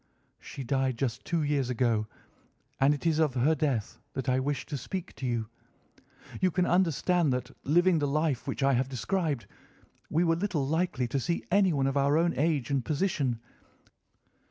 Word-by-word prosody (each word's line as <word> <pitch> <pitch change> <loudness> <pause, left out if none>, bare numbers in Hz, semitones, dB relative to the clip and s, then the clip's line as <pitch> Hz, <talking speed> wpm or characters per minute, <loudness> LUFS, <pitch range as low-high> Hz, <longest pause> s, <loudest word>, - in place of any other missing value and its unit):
"She 140 - -8
died 130 -1 0
just 125 -1 -2
two 170 -3 0
years 145 -3 0
ago, 115 -3 +1 0.7
and 135 +2 +5
it 145 - -9
is 160 -2 +2
of 150 -5 +2
her 135 +6 +3
death 135 -8 -1
that 135 -2 -4
I 130 0 +3
wish 140 +2 -2
to 150 - -5
speak 180 +7 -5
to 130 - -3
you. 115 -3 -1 0.9
You 185 - +4
can 180 +1 +1
understand 175 -2 +2
that, 125 +1 -3
living 175 +3 +4
the 145 - 0
life 150 -2 0
which - - -2
I 135 0 +4
have 130 +1 +1
described, 145 - -1 0.6
we 165 +3 +2
were 165 -1 +3
little 170 -6 -1
likely 160 -4 0
to 135 - 0
see 170 +5 -2
anyone 180 -8 +3
of 135 +1 0
our 140 +2 +3
own 170 +1 +2
age 145 -1 0
and 135 -3 +1
position. 145 - 0
145 Hz, 180 wpm, -29 LUFS, 130-165 Hz, 0.9 s, and